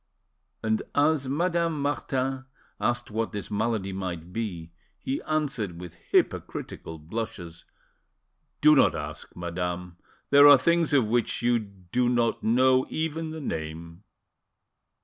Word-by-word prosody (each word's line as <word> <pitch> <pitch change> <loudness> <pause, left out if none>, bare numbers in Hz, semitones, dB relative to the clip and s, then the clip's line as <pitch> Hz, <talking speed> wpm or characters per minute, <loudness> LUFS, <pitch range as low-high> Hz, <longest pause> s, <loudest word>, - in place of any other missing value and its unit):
And 110 -1 +1
as 145 -2 +2
Madame 170 +1 0
Martin 135 -2 -2 0.3
asked 120 -2 -1
what 115 +1 -2
this 105 0 -5
malady 105 -2 -1
might 90 -2 -5
be, 90 -7 -4 0.3
he 135 - -3
answered 135 - -1
with 90 -2 -8 0.2
hypocritical 80 - -1
blushes— 85 0 -6 1.0
"Do 150 +1 +7
not 135 - +4
ask, 75 0 -7
madame; 90 0 -4 0.3
there 145 +1 +9
are 145 -1 +10
things 170 +4 +2
of 135 -5 +4
which 120 +2 0
you 120 0 +3
do 100 +3 -2
not 120 -2 +1
know 130 +3 +3
even 160 0 -2
the 160 0 -6
name." 85 - -6
115 Hz, 125 wpm, -27 LUFS, 90-140 Hz, 1.0 s, are